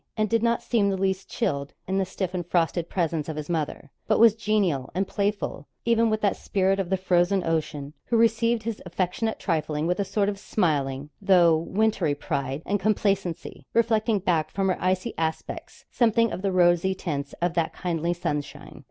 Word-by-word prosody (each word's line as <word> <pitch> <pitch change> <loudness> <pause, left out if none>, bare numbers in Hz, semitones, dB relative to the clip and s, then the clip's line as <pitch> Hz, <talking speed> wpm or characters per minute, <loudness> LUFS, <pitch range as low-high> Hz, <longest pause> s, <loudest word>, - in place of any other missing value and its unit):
and 215 0 0
did 230 -1 +3
not 235 0 +1
seem 210 -4 +2
the 195 - -1
least 190 0 -1
chilled 140 - -2
in 190 +1 0
the 190 - +1
stiff 185 -1 -4
and 175 -2 -3
frosted 170 -1 0
presence 165 -4 -1
of 155 - -4
his 150 +2 -5
mother, 150 -3 -3 0.2
but 215 - +3
was 230 -2 +7
genial 205 - 0
and 190 +1 0
playful 200 -7 -2 0.2
even 230 -1 +3
with 215 0 0
that 200 -2 +2
Spirit 195 0 0
of 190 -3 -2
the 190 - +1
Frozen 185 +1 +2
Ocean, 155 -3 -2
who 235 - +1
received 230 0 +2
his 225 -1 -4
affectionate 185 +5 -2
trifling 155 -3 -1
with 180 +3 0
a - - +2
sort 200 +1 0
of 200 -1 -2
smiling, 145 -8 -1
though 180 -4 +5
wintry 180 -2 0
pride 140 +1 -3
and 205 +1 0
complacency, 195 -4 -1
reflecting 225 -1 +2
back 165 -5 0
from 195 -1 0
her 185 - +1
icy 185 +5 0
aspects 160 -1 -4
something 230 -1 +3
of - - -4
the 195 0 0
rosy 180 +1 +3
tints 140 -6 -4
of 175 0 -1
that 165 -2 0
kindly 170 -1 -2
sunshine. 150 -4 -4
185 Hz, 185 wpm, -25 LUFS, 165-210 Hz, 0.2 s, was